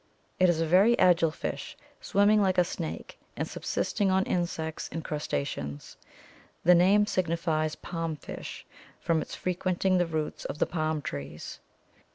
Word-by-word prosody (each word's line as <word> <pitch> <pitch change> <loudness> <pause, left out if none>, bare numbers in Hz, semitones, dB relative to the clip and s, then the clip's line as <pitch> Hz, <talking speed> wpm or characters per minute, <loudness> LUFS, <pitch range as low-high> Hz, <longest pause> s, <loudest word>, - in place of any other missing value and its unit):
It 185 -1 +5
is 170 -2 +2
a 165 - +2
very 195 +9 +5
agile 175 -3 +5
fish, 155 - -5 0.2
swimming 205 +1 +4
like 190 -2 +2
a 180 - +6
snake 170 -2 -6 0.2
and - - -2
subsisting 205 -2 -1
on 190 0 +3
insects 165 -4 -2
and 165 - -4
crustaceans. 70 - -4 0.7
The 180 - +7
name 195 +4 +5
signifies 165 -4 0
palm 165 -2 -4
fish, 145 - -8 0.3
from 165 -2 +1
its - - -6
frequenting 185 +1 0
the 175 - +2
roots 155 -2 -3
of 140 - -4
the - - +2
palm 155 -3 -2
trees. 70 -1 -6
170 Hz, 150 wpm, -28 LUFS, 155-185 Hz, 0.7 s, The